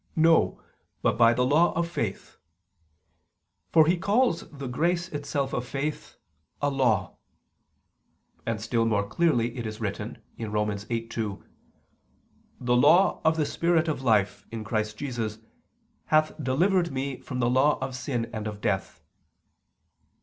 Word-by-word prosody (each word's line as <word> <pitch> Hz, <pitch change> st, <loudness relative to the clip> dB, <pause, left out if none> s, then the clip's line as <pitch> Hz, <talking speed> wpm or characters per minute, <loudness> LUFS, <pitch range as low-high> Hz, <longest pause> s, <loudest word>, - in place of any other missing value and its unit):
No, 165 Hz, 0 st, +4 dB, 0.4 s
but -, -, +2 dB
by 115 Hz, 0 st, +6 dB
the 125 Hz, +1 st, +2 dB
law 155 Hz, +6 st, +4 dB
of 170 Hz, 0 st, 0 dB
faith": 115 Hz, -, -4 dB, 1.3 s
for 160 Hz, -2 st, +6 dB
he 170 Hz, +2 st, +2 dB
calls 200 Hz, -1 st, +1 dB
the 140 Hz, -2 st, -8 dB
grace 170 Hz, +7 st, 0 dB
itself 140 Hz, -2 st, -3 dB
of 125 Hz, -, -1 dB
faith 140 Hz, +4 st, -4 dB, 0.4 s
"a 145 Hz, 0 st, 0 dB
law." 110 Hz, -9 st, +1 dB, 1.3 s
And 115 Hz, -2 st, -2 dB
still 115 Hz, +1 st, 0 dB
more 100 Hz, -2 st, +1 dB
clearly 120 Hz, -6 st, +1 dB
it 120 Hz, -3 st, -4 dB
is 110 Hz, 0 st, -7 dB
written -, -, -4 dB, 0.2 s
(Rom. 105 Hz, -1 st, -1 dB
8:2): 110 Hz, 0 st, -4 dB, 1.2 s
"The 125 Hz, 0 st, +1 dB
law 180 Hz, +9 st, +5 dB
of 160 Hz, 0 st, +3 dB
the 155 Hz, -, +2 dB
spirit 170 Hz, +1 st, +1 dB
of 155 Hz, -4 st, -2 dB
life, 105 Hz, -4 st, +1 dB
in 115 Hz, -1 st, -6 dB
Christ 110 Hz, 0 st, -2 dB
Jesus, 115 Hz, -6 st, -3 dB, 0.7 s
hath 155 Hz, 0 st, +3 dB
delivered 170 Hz, +6 st, +2 dB
me 135 Hz, 0 st, -3 dB
from 130 Hz, -, -6 dB
the 120 Hz, -1 st, +1 dB
law 135 Hz, +4 st, +3 dB
of 130 Hz, -, -4 dB
sin 125 Hz, -3 st, -2 dB
and 110 Hz, -1 st, -4 dB
of 105 Hz, -1 st, -6 dB
death." 95 Hz, -2 st, -2 dB
130 Hz, 140 wpm, -27 LUFS, 110-155 Hz, 1.3 s, by